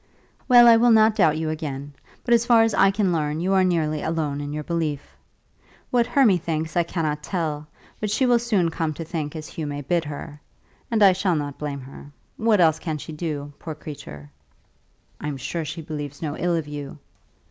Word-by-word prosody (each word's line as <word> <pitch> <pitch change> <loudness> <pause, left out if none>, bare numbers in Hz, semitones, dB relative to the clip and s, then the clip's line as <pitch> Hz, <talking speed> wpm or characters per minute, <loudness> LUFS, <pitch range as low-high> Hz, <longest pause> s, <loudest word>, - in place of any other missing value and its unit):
"Well, 245 -2 +8
I 230 -1 +8
will 240 +1 +4
not 220 -1 +6
doubt 155 -6 +3
you 160 0 -2
again. 145 -2 -5 0.3
But 240 - +2
as 235 -1 +4
far 235 -2 +5
as 225 -1 +1
I 195 - +5
can 195 -1 +1
learn 150 -1 -1
you 185 +3 0
are 190 -1 +4
nearly 155 -4 0
alone 155 -3 -2
in 145 0 -5
your 150 0 -4
belief. 155 -3 -3 0.8
What 240 -1 +2
Hermy 225 -10 +4
thinks 160 -1 -3
I 175 - +4
cannot 155 -3 -2
tell, 155 -3 -3 0.3
but 210 - -2
she 260 +6 +1
will 245 -1 +4
soon 205 -8 +1
come 160 -2 -2
to 165 - -5
think 155 -2 -4
as 155 -1 -6
Hugh 155 -2 -5
may 145 0 -4
bid 170 +4 0
her. 150 0 -8 0.5
And 220 -3 +2
I 195 - +8
shall 185 -1 0
not 145 -2 -4
blame 145 -2 -4
her. 140 +2 -12 0.2
What 220 -2 +2
else 160 -2 +4
can 160 -3 -3
she 155 - -8
do, 150 -3 -5
poor 160 -2 -6
creature?" 105 - -10 0.9
"I - - -5
am 145 -2 -3
sure 165 +5 -4
she 155 +2 -6
believes 145 -2 -6
no 150 -2 -4
ill 175 -1 0
of 160 -3 -2
you." 145 -1 -7
160 Hz, 210 wpm, -23 LUFS, 150-190 Hz, 0.9 s, Well